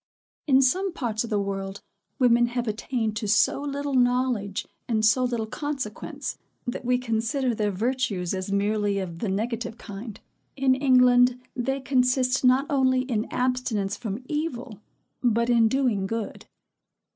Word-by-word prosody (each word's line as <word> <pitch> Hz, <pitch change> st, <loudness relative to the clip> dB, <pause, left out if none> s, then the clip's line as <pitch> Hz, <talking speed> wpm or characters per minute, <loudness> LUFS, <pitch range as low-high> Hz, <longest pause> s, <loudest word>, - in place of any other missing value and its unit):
In 270 Hz, -1 st, +5 dB
some 370 Hz, +9 st, +2 dB
parts 230 Hz, -7 st, -2 dB
of 235 Hz, -, -6 dB
the 210 Hz, -2 st, +1 dB
world, 195 Hz, 0 st, -4 dB, 0.4 s
women 240 Hz, -2 st, +4 dB
have 240 Hz, 0 st, -3 dB
attained 220 Hz, 0 st, -2 dB
to 210 Hz, -, -3 dB
so 215 Hz, +6 st, +3 dB
little 285 Hz, 0 st, -3 dB
knowledge 245 Hz, -5 st, +1 dB, 0.2 s
and 220 Hz, -2 st, +1 dB
so 255 Hz, +4 st, +4 dB
little 240 Hz, -3 st, -1 dB
consequence, 265 Hz, -2 st, -5 dB, 0.3 s
that 245 Hz, +1 st, -4 dB
we 250 Hz, 0 st, +2 dB
consider 245 Hz, +2 st, -1 dB
their 210 Hz, -1 st, 0 dB
virtues 210 Hz, -3 st, -1 dB
as 185 Hz, +1 st, -3 dB
merely 205 Hz, 0 st, +1 dB
of 175 Hz, -4 st, -4 dB
the 215 Hz, -, -2 dB
negative 225 Hz, +3 st, -2 dB
kind. 205 Hz, 0 st, -8 dB, 0.4 s
In 270 Hz, -1 st, +3 dB
England 250 Hz, -2 st, +4 dB, 0.2 s
they 270 Hz, +2 st, -1 dB
consist 255 Hz, 0 st, +2 dB
not 255 Hz, +2 st, +4 dB
only 260 Hz, -2 st, +2 dB
in 240 Hz, -4 st, -1 dB
abstinence 250 Hz, -6 st, -1 dB
from 225 Hz, +1 st, -5 dB
evil, 260 Hz, -, -4 dB, 0.4 s
but 235 Hz, 0 st, +2 dB
in 230 Hz, -2 st, +5 dB
doing 225 Hz, -6 st, +1 dB
good. 225 Hz, 0 st, -5 dB
240 Hz, 145 wpm, -25 LUFS, 215-255 Hz, 0.4 s, In